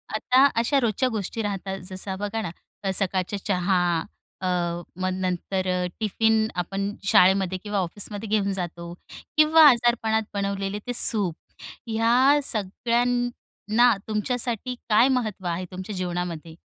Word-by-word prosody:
आता 255 Hz, +5 st, +4 dB
अशा 275 Hz, +4 st, +2 dB
रोजच्या 250 Hz, +1 st, 0 dB
गोष्टी 220 Hz, 0 st, -3 dB
राहतात. 195 Hz, -2 st, -4 dB
जसं 190 Hz, 0 st, -4 dB
बघा 205 Hz, +2 st, -3 dB
ना 185 Hz, -6 st, -4 dB, 0.4 s
सकाळचा 190 Hz, +1 st, 0 dB
चहा, 185 Hz, -1 st, +1 dB, 0.6 s
अ, 185 Hz, -, -2 dB, 0.5 s
मग 185 Hz, -, 0 dB
नंतर 185 Hz, +1 st, -2 dB
अ, 180 Hz, 0 st, 0 dB
टिफिन 220 Hz, +1 st, +1 dB
आपण 195 Hz, +3 st, -3 dB, 0.2 s
शाळेमध्ये 190 Hz, 0 st, +4 dB
किंवा 205 Hz, -1 st, -2 dB
ऑफिसमध्ये 205 Hz, +4 st, -3 dB
घेऊन 205 Hz, -2 st, +1 dB
जातो 170 Hz, -2 st, -5 dB, 0.4 s
किंवा 315 Hz, +1 st, +6 dB
आजारपणात 235 Hz, -3 st, +2 dB
बनवलेले 200 Hz, 0 st, -2 dB
ते 245 Hz, -, -2 dB
सूप 205 Hz, -9 st, +4 dB, 0.6 s
या 250 Hz, +6 st, +4 dB
सगळ्यांना 240 Hz, +1 st, 0 dB
तुमच्यासाठी 240 Hz, +2 st, -1 dB
काय 220 Hz, +4 st, +5 dB
महत्त्व 215 Hz, -5 st, -6 dB
आहे, 175 Hz, +2 st, -2 dB
तुमच्या 190 Hz, +3 st, -6 dB
जीवनामध्ये? 175 Hz, -3 st, -4 dB
205 Hz, 120 wpm, -24 LUFS, 185-230 Hz, 0.6 s, किंवा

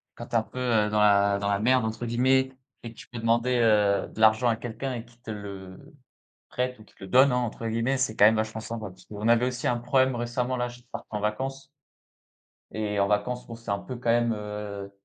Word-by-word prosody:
quand 120 Hz, -, -8 dB
tu -, -, -23 dB
es -, -, +7 dB
un -, -, -3 dB
peu, 125 Hz, -, -9 dB
heu, 110 Hz, -4 st, +2 dB
dans 105 Hz, 0 st, +1 dB
la 100 Hz, -1 st, +4 dB
dans 100 Hz, 0 st, -1 dB
la 100 Hz, 0 st, +1 dB
«merde» 125 Hz, +1 st, +3 dB
entre 110 Hz, +2 st, -4 dB
guillemets, 130 Hz, +3 st, +2 dB, 0.3 s
et 115 Hz, -, -6 dB
que -, -, -28 dB
tu -, -, -12 dB
peux 120 Hz, -2 st, -7 dB
demander, 120 Hz, +2 st, +2 dB
heu, 105 Hz, -3 st, +3 dB
de -, -, -12 dB
l'argent 110 Hz, +3 st, +5 dB
à 115 Hz, -, +2 dB
quelqu'un 120 Hz, +3 st, -5 dB
et 115 Hz, 0 st, -6 dB
qu'il 120 Hz, 0 st, -23 dB
te 110 Hz, -, -7 dB
le 100 Hz, +1 st, -9 dB, 0.6 s
prête 125 Hz, 0 st, -2 dB
ou -, -, -13 dB
qu'il -, -, -24 dB
te -, -, -12 dB
le 95 Hz, -, -8 dB
«donne» 130 Hz, +1 st, +6 dB
hein, 125 Hz, -, +1 dB
entre 115 Hz, -1 st, -3 dB
guillemets, 115 Hz, +4 st, 0 dB
c'est 125 Hz, -4 st, -1 dB
quand 105 Hz, -, +6 dB
même 110 Hz, +1 st, +6 dB
vachement 110 Hz, 0 st, -2 dB
sympa 110 Hz, -2 st, -6 dB
parce 95 Hz, 0 st, -17 dB
qu'on 105 Hz, +1 st, -4 dB
avait 120 Hz, +1 st, +4 dB
aussi 125 Hz, -1 st, -3 dB
un 120 Hz, -, +1 dB
problème 130 Hz, +1 st, +2 dB
récemment 125 Hz, +2 st, -2 dB
là, 125 Hz, 0 st, -1 dB
juste 120 Hz, 0 st, -15 dB
parte 115 Hz, -, -7 dB
en 105 Hz, -, -3 dB
vacances 135 Hz, +6 st, -3 dB, 1.1 s
et 105 Hz, -2 st, -2 dB
en 100 Hz, -, +3 dB
vacances, 105 Hz, +5 st, -1 dB
bon 115 Hz, -, -7 dB
c'est 115 Hz, -3 st, -6 dB
un 100 Hz, -, 0 dB
peu 125 Hz, -, -7 dB
quand 120 Hz, -1 st, -3 dB
même, 120 Hz, 0 st, +3 dB
heu 105 Hz, -1 st, -6 dB
115 Hz, 250 wpm, -26 LUFS, 105-125 Hz, 1.1 s, es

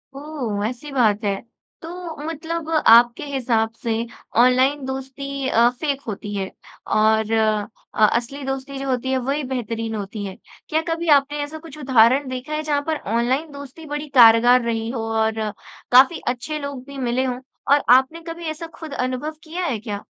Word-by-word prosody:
ओह! 275 Hz, -8 st, -4 dB
वैसी 245 Hz, +7 st, -4 dB
बात 220 Hz, -5 st, +2 dB
है 200 Hz, -1 st, +1 dB, 0.5 s
तो 340 Hz, 0 st, -7 dB
मतलब 325 Hz, 0 st, -4 dB, 0.2 s
आपके 235 Hz, +3 st, +6 dB
हिसाब 240 Hz, -5 st, 0 dB
से 230 Hz, -, -1 dB, 0.5 s
ऑनलाइन 260 Hz, +3 st, +3 dB
दोस्ती 270 Hz, +1 st, -5 dB
अ, 235 Hz, +1 st, +5 dB
फ़ेक 275 Hz, +2 st, -3 dB
होती 205 Hz, -1 st, -5 dB
है 190 Hz, -1 st, -3 dB, 0.5 s
और 220 Hz, 0 st, +3 dB
अ, 215 Hz, -1 st, 0 dB
असली 245 Hz, +6 st, -2 dB
दोस्ती 270 Hz, +1 st, -4 dB
जो 275 Hz, 0 st, -4 dB
होती 260 Hz, +1 st, -1 dB
है 265 Hz, -, +2 dB
वही 275 Hz, +4 st, -1 dB
बेहतरीन 230 Hz, -2 st, -3 dB
होती 205 Hz, 0 st, -5 dB
हैं। 190 Hz, -1 st, -7 dB, 0.3 s
क्या 315 Hz, +1 st, +1 dB
कभी 335 Hz, +1 st, -2 dB
आपने 290 Hz, +1 st, -3 dB
ऐसा 295 Hz, +2 st, -7 dB
कुछ 315 Hz, -2 st, -12 dB
उदाहरण 260 Hz, 0 st, +4 dB
देखा 255 Hz, +4 st, -5 dB
है 305 Hz, -, -1 dB
जहाँ 295 Hz, -2 st, 0 dB
पर 315 Hz, -, 0 dB, 0.2 s
ऑनलाइन 260 Hz, +7 st, 0 dB
दोस्ती 285 Hz, +3 st, -10 dB
बड़ी 295 Hz, +1 st, -4 dB
कारगर 240 Hz, +2 st, +7 dB
रही 225 Hz, -1 st, -1 dB
हो 235 Hz, -3 st, -3 dB
और 220 Hz, 0 st, 0 dB, 0.5 s
काफ़ी 260 Hz, +6 st, +6 dB
अच्छे 255 Hz, +5 st, -2 dB
लोग 280 Hz, -3 st, -6 dB
भी 280 Hz, -1 st, -10 dB
मिले 255 Hz, 0 st, 0 dB
हों 250 Hz, -1 st, -2 dB, 0.3 s
और 290 Hz, -, +3 dB
आपने 265 Hz, +6 st, +1 dB
कभी 335 Hz, +1 st, -6 dB
ऐसा 315 Hz, +2 st, -7 dB
खुद 315 Hz, -3 st, -8 dB
अनुभव 255 Hz, +4 st, -3 dB
किया 345 Hz, +3 st, -4 dB
है 250 Hz, -9 st, -1 dB
क्या? 205 Hz, -2 st, -6 dB
260 Hz, 170 wpm, -22 LUFS, 230-295 Hz, 0.5 s, कारगर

